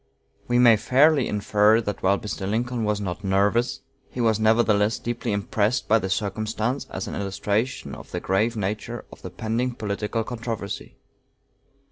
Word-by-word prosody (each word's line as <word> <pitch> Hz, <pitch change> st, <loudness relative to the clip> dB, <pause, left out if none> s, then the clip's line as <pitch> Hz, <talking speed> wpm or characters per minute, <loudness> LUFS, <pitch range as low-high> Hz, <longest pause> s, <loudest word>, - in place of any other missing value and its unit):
We 120 Hz, -, +2 dB
may 120 Hz, -3 st, +7 dB
fairly 135 Hz, +5 st, +4 dB
infer 105 Hz, +1 st, +3 dB
that 105 Hz, -3 st, -4 dB
while 100 Hz, +1 st, +3 dB
Mr. 100 Hz, -2 st, -5 dB
Lincoln 120 Hz, +2 st, -1 dB
was 105 Hz, -1 st, 0 dB
not 95 Hz, 0 st, -4 dB
"nervous," 100 Hz, +6 st, +1 dB, 0.3 s
he -, -, -8 dB
was 110 Hz, -3 st, +2 dB
nevertheless 110 Hz, -1 st, +3 dB
deeply 120 Hz, -1 st, -3 dB
impressed 105 Hz, +4 st, 0 dB
by 115 Hz, +1 st, +4 dB
the 95 Hz, -, -3 dB
circumstance 110 Hz, +6 st, -2 dB
as 95 Hz, -, -5 dB
an -, -, -5 dB
illustration 100 Hz, +5 st, -2 dB
of -, -, -10 dB
the -, -, -3 dB
grave 110 Hz, +5 st, 0 dB
nature 105 Hz, +4 st, -3 dB
of -, -, -13 dB
the -, -, -6 dB
pending 120 Hz, +3 st, -2 dB
political 105 Hz, +1 st, -2 dB
controversy. 115 Hz, -4 st, -5 dB
110 Hz, 155 wpm, -24 LUFS, 100-120 Hz, 0.3 s, may